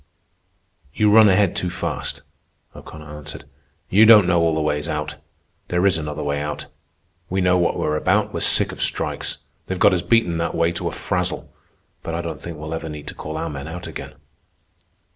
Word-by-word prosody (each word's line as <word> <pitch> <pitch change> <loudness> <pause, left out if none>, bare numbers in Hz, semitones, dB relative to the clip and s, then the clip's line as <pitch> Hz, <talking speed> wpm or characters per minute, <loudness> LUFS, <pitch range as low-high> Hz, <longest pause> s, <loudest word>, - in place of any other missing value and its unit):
_" - - -31 1.0
"You 105 -1 +4
run 110 0 +7
ahead 100 -1 +3
too 90 - 0
fast," 85 - -4 0.5
O'Connor 75 0 -11
answered. 75 -1 -9 0.4
"You 110 +4 +5
don't 110 -4 +8
know 90 -1 +3
all 80 -1 +2
the - - 0
ways 75 -1 -1
out. 75 -2 -3 0.5
There 90 +2 0
is 100 - +4
another 75 -1 -4
way 70 0 -1
out. 75 0 -4 0.6
We 95 - -1
know 90 -1 +3
what 85 - +1
we're 75 - 0
about. - - +1
We're - - -2
sick - - +4
of - - -7
strikes. - - -1 0.3
They've 95 - -3
got 100 +1 +5
us 90 - +1
beaten 105 -5 +2
that 85 - -2
way 85 0 +2
to 85 - -3
a - - -2
frazzle. - - -3 0.5
But 80 - -4
I 85 - -3
don't 85 - -6
think 85 -2 -7
we'll 80 +1 -6
ever 80 0 -5
need 75 -1 -8
to - - -8
call 80 +1 -6
our 80 - -3
men 70 0 -7
out 85 +2 -7
again." - - -8
85 Hz, 200 wpm, -21 LUFS, 75-90 Hz, 1.0 s, don't